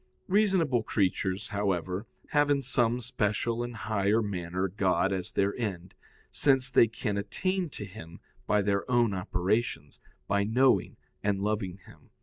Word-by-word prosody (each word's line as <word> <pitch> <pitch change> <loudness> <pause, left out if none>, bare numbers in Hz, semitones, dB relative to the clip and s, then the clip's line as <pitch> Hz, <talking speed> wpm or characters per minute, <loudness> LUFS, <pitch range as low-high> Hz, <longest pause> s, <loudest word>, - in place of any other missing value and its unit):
Reasonable 185 - +3
creatures, 95 0 -1
however, 95 0 -1 0.2
have 145 0 +3
in 140 -1 +2
some 120 -2 +1
special 115 0 -1
and 120 0 -4
higher 110 +1 +1
manner 95 -2 -2
God 95 0 +1
as 95 +1 -3
their 100 +1 +1
end, 95 -7 -4 0.4
since 135 -3 +2
they 115 - +6
can 105 -2 -3
attain 185 - -1
to 105 - -7
Him 85 -4 -11 0.3
by 105 -1 +3
their 100 +3 0
own 120 -4 +3
operations, 90 - -1 0.3
by 100 0 +2
knowing 125 +5 +2 0.2
and 100 -1 0
loving 105 -3 -1
Him. - - -18
105 Hz, 140 wpm, -29 LUFS, 95-120 Hz, 0.4 s, they